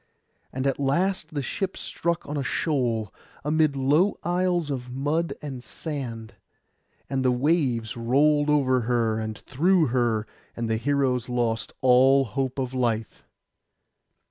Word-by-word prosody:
And 130 +1 -3
at 135 0 0
last 170 +6 0
the 145 - -1
ship 190 +6 -3
struck 170 -2 -3
on 145 - -4
a 145 - -1
shoal, 120 - -1 0.3
amid 155 -1 +2
low 145 +9 +2
isles 175 -3 0
of 125 -2 -4
mud 145 +6 -1
and 135 -4 -6
sand, 125 -10 -5 0.7
and 135 -1 -1
the 130 - +3
waves 125 -4 +1
rolled 145 +5 +2
over 135 -4 +3
her 115 -2 +1
and 110 -1 -4
through 165 +2 +2
her, 115 -4 +1 0.3
and 115 -1 -2
the 110 0 0
heroes 130 -1 0
lost 120 -2 -1
all 135 +1 +5
hope 130 +4 -3
of 130 -1 -2
life. 115 -4 -2
135 Hz, 140 wpm, -25 LUFS, 120-150 Hz, 0.7 s, all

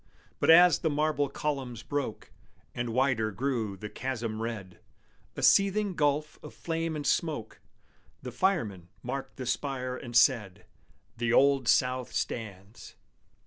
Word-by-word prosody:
But, - - +1
as 175 +1 +8
the 160 - 0
marble 150 -1 0
columns 135 -6 -4
broke, 145 -6 -4 0.4
And 120 0 -3
wider 125 -3 +1
grew 110 -2 -2
the 105 - -6
chasm 115 -2 -4
red, 105 -6 -6 0.6
A - - -4
seething 200 0 +4
gulf 150 -1 0
of - - -11
flame 165 -1 -3
and 145 -1 -5
smoke, 145 -11 -1 0.6
The 125 - -6
firemen 115 - -1
marked 135 +2 -5
the 130 - -5
spire 130 0 -2
and 120 -2 -8
said, 110 -7 +2 0.5
"The 115 0 0
Old 135 0 +4
South 125 0 +2
stands!" 105 -2 -5
130 Hz, 135 wpm, -29 LUFS, 115-150 Hz, 0.6 s, as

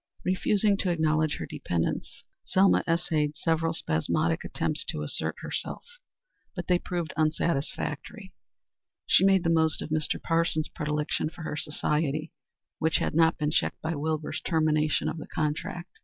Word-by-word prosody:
Refusing 200 +2 +2
to 190 - -1
acknowledge 155 -2 +2
her - - -4
dependence, 85 -2 -3 0.2
Selma 190 +1 +4
essayed 155 -3 +1
several 165 +1 +1
spasmodic 80 - 0
attempts - - -1
to 75 - -3
assert 75 - -2
herself, - - -4 0.7
but 175 - -4
they 180 -1 +3
proved 175 -3 -3
unsatisfactory. 155 +4 -1 0.7
She - - +5
made 195 -2 +5
the 165 - +2
most 160 -1 +3
of - - -4
Mr. 155 -1 0
Parsons's 165 -2 0
predilection 150 -1 -1
for 165 - -10
her 155 - -3
society, 150 +1 -1 0.5
which 160 0 +2
had - - -1
not 165 +1 +4
been 150 -2 0
checked - - +1
by 160 +1 -1
Wilbur's 155 0 -2
termination 155 -2 +1
of - - -2
the - - -8
contract. 155 +4 -3
160 Hz, 145 wpm, -28 LUFS, 150-170 Hz, 0.7 s, She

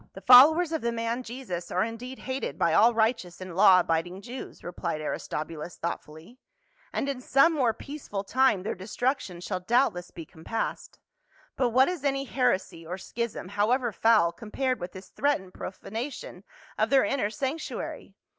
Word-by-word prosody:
" - - -49
The 195 - -9
followers 300 - +8
of 320 - -1
the 235 - 0
man 230 +1 -2
Jesus 230 -8 -6
are - - +1
indeed 235 +3 -6
hated 260 - -4
by 165 -1 +2
all 230 +7 +6
righteous 220 -6 0
and 185 -2 -8
law 190 -1 +7
abiding 175 +3 -2
Jews," 250 +4 -8
replied 175 -3 -4
Aris 155 - -4
tobulus 155 +2 -5
thoughtfully, 165 +7 -7 0.3
" - - -34
and - - -2
in 275 -2 -3
some 275 +6 +4
more 260 -7 +2
peaceful 245 -5 -6
time 245 -3 +2
their 210 - -2
destruction 210 0 -2
shall 180 - -3
doubtless 185 -3 +1
be 165 - -9
compassed; 165 +9 -5 0.6
but 255 -2 +1
what 260 +3 +4
is 355 -6 -3
any 275 -1 0
heresy 220 -11 0
or 175 +3 -5
schism, 220 -1 -5
however 230 +5 +1
foul, 215 -5 +4
com 210 +6 -11
pared 260 +2 -1
with 175 0 -6
this 190 0 -11
threatened 265 -11 -1
profanation 220 -1 -7 0.3
of 215 +1 +2
their 270 0 +5
inner 250 -7 0
sanctuary 270 +8 -5
225 Hz, 175 wpm, -27 LUFS, 180-260 Hz, 0.6 s, followers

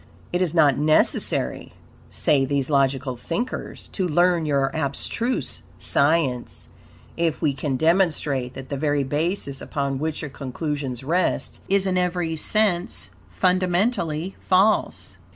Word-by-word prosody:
It 175 - +1
is 175 -2 0
not 150 -5 +5
necessary," 155 +1 +1 0.4
say 140 -2 +2
these 140 +1 -1
logical 135 -2 +1
thinkers, 170 - -4
"to 190 -3 -1
learn 175 0 +3
your 140 -2 +1
abstruse 160 - -2 0.2
science 140 -4 0 0.5
if 165 -2 0
we 150 -4 +1
can 135 0 -2
demonstrate 150 -5 +1
that 135 0 -8
the 140 - -2
very 145 0 +1
basis 145 0 -2
upon 140 -2 -2
which 155 +1 -2
your 150 - -5
conclusions 135 -2 -4
rest 170 +6 0
is 195 0 +3
in 185 -1 +1
every 175 -2 -1
sense 180 +1 0 0.2
fundamentally 185 -2 0
false." 195 +3 +2
155 Hz, 125 wpm, -23 LUFS, 140-180 Hz, 0.5 s, not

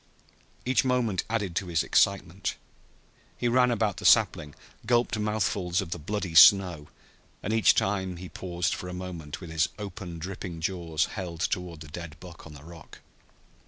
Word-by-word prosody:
Each 130 +2 +2
moment 125 -7 0
added 105 -6 -2
to 95 - -2
his 85 -3 +1
excitement 95 -1 +1 0.8
He 120 - -1
ran 125 +1 +4
about 110 -5 0
the 105 - -8
sapling, 90 -9 +4 0.3
gulped 120 -2 +1
mouthfuls 100 -4 0
of 95 -4 -4
the 85 - -3
bloody 95 +2 -4
snow, 85 -2 +7 0.6
and 110 - -1
each 110 -1 +5
time 95 -2 -1
he 90 +1 -8
paused 90 +1 -2
for 90 - -6
a 90 - -6
moment 85 -5 -7
with 85 -3 -8
his 80 -1 +1
open 95 -4 -7
dripping 90 0 -6
jaws 85 -2 -1
held 85 -5 -6
toward 90 -4 -2
the 80 - -9
dead 80 0 -9
buck 85 -2 -12
on 80 - -12
the 70 - -13
rock. 85 0 -13
90 Hz, 165 wpm, -27 LUFS, 85-105 Hz, 0.8 s, snow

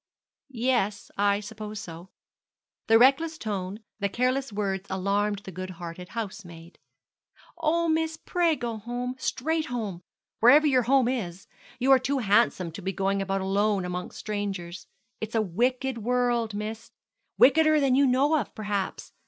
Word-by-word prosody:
'Yes; 235 -5 -1
I 200 0 +2
suppose 215 0 -7
so.' 170 -2 -9 0.8
The 225 - +6
reckless 275 +7 +4
tone, 205 -3 -4 0.2
the 200 -1 0
careless 255 +4 0
words 195 -2 -2
alarmed 200 +2 0
the 190 - -8
good 185 +1 -6
hearted 175 +1 -8
housemaid. 190 -7 -7 0.8
'Oh, 335 +1 +1
miss, 320 0 0
pray 340 -1 +1
go 235 -4 -4
home, 245 +3 -4
straight 315 +5 -1
home 215 -8 -4 0.4
wherever 285 +7 +7
your 265 -4 +4
home 270 -3 +4
is. 195 -8 -3 0.3
You 260 +2 +2
are 265 - +7
too 275 +2 -1
handsome 205 -6 +2
to 165 - -9
be 190 +1 -2
going 195 +1 0
about 195 0 -1
alone 200 0 +1
among 180 0 -4
strangers. 195 -5 -5 0.3
It's 220 +1 -5
a 225 - +3
wicked 250 +6 -1
world, 240 -1 0
miss 215 +2 -5 0.5
wickeder 310 +2 +5
than 275 -3 +2
you 275 +1 +4
know 275 +5 +3
of, 230 - -6
perhaps. 205 -2 -3
220 Hz, 150 wpm, -27 LUFS, 195-260 Hz, 0.8 s, wherever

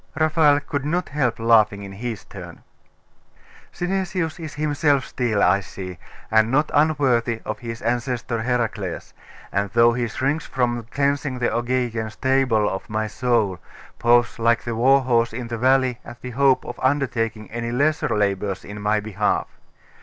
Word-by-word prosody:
Raphael 155 -2 +4
could 145 -1 -3
not 170 +4 -1
help 130 -6 0
laughing 110 -3 +3
in 100 - -8
his 110 +1 -6
turn. - - -11 1.1
'Synesius 180 -2 -2
is 160 -3 -7
himself 145 -2 +1
still, 115 -5 0
I 95 +2 +4
see, 90 -2 -8 0.3
and 110 0 +4
not 150 +5 +1
unworthy 135 -7 +2
of 110 - -4
his 115 -1 -7
ancestor 120 0 -1
Hercules; 115 -6 -2 0.4
and 100 0 0
though 115 0 +5
he 120 0 -1
shrinks 135 +7 -2
from 120 -3 -1
cleansing 140 -1 0
the 120 -2 0
Augean 120 -2 -1
stable 125 -2 +1
of 95 - -4
my 110 0 -1
soul, 110 -5 0 0.4
paws 120 0 +3
like 115 +1 +2
the 120 - -3
war 135 +4 +4
horse 120 -3 +1
in 120 0 -5
the 115 - -3
valley 130 -1 +2
at 120 0 -11
the 125 - -5
hope 135 +1 +3
of - - -7
undertaking 115 -5 -1
any 115 +1 -3
lesser 150 +5 +1
labours 100 -2 -1
in 105 0 -8
my 105 +1 +1
behalf. 105 -1 -1
120 Hz, 155 wpm, -22 LUFS, 110-135 Hz, 1.1 s, though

